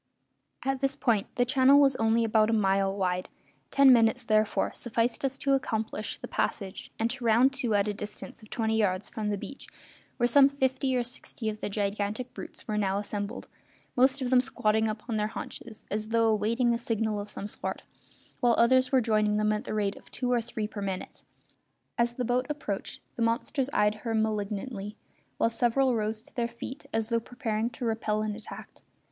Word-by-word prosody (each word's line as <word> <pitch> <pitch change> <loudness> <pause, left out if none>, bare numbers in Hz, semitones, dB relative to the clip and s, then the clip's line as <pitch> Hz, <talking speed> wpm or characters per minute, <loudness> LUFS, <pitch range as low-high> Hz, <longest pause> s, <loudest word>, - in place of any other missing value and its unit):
At 270 0 0
this 275 0 0
point 225 -6 +1
the 245 - +3
channel 265 +2 +6
was 275 -2 +5
only 225 +1 +3
about 220 -1 +3
a - - +2
mile 195 -2 +2
wide; 180 -1 -1 0.4
ten 275 -2 +7
minutes, 235 +1 +3
therefore, 215 -1 +1
sufficed 235 +1 -1
us 270 0 0
to 275 0 +1
accomplish 220 -5 -1
the - - -8
passage 195 -3 -3
and 225 - +1
to 255 -1 -6
round 235 +4 +4
to 230 -5 +1
at 200 0 +2
a 210 - 0
distance 210 +2 -7
of 215 - -15
twenty 220 -1 0
yards 195 -2 +1
from 215 -2 -3
the 205 - 0
beach, 275 - -9 0.5
where 240 - +2
some 275 +3 +6
fifty 265 -1 0
or 245 - +1
sixty 235 -2 -5
of 215 0 -5
the - - -2
gigantic 205 +4 -2
brutes - - -9
were 210 -1 0
now 195 -1 +1
assembled, 205 +1 -4 0.5
most 260 +2 +3
of 250 - -2
them 255 -1 +6
squatting 220 -4 +1
upon 215 +1 -3
their 210 0 +1
haunches, 220 0 -8
as 215 +1 -2
though 225 0 +3
awaiting 230 +3 +2
a 235 - -1
signal 220 -2 -1
of 205 0 -6
some 205 - -6
sort, - - -5 0.6
while 240 -2 +4
others 255 +2 +4
were 260 -2 +5
joining 215 -2 +2
them 215 0 +2
at 210 - -3
the - - -4
rate 205 -2 0
of - - -16
two 250 -1 -2
or 240 -1 +3
three 220 -2 -4
per 210 -1 -7
minute. 190 -2 -5 0.8
As 235 0 +2
the 250 - -2
boat 250 +2 +1
approached, 250 -10 -4 0.2
the - - -3
monsters 235 +4 0
eyed 210 -5 +3
her 230 -2 -2
malignantly, 210 0 -2 0.4
while 230 - +2
several 245 +3 +2
rose 220 0 -2
to - - -22
their 240 -2 0
feet 260 +5 -8
as 225 0 -1
though 230 -1 +2
preparing 230 -2 -2
to 245 +1 -6
repel 215 -1 0
an 215 -1 -2
attack. 220 - -10
225 Hz, 200 wpm, -28 LUFS, 210-250 Hz, 0.8 s, ten